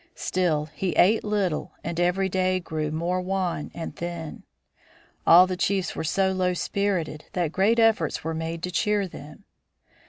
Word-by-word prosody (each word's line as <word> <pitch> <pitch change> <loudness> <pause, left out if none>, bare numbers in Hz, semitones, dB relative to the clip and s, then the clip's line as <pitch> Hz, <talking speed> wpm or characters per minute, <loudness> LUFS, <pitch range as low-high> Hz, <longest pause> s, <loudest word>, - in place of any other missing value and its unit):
Still 165 -5 0
he 185 +4 -2
ate 210 +5 +4
little 200 -6 -1
and 170 +1 -3
every 180 +2 +2
day 185 0 +1
grew 155 -3 -3
more 170 +4 -1
wan 185 -4 -2
and 165 - -6
thin. 170 -2 -6 0.9
All 175 +2 +9
the 185 0 -3
chiefs 190 +1 -1
were - - -3
so 190 +4 +1
low 185 -1 0
spirited 175 -6 -2
that 175 -4 0
great 205 +6 +2
efforts 225 -8 +2
were 165 +1 -2
made 165 +1 -4
to 180 - -2
cheer 205 +1 +1
them. 150 +2 -12
180 Hz, 160 wpm, -25 LUFS, 165-190 Hz, 0.9 s, All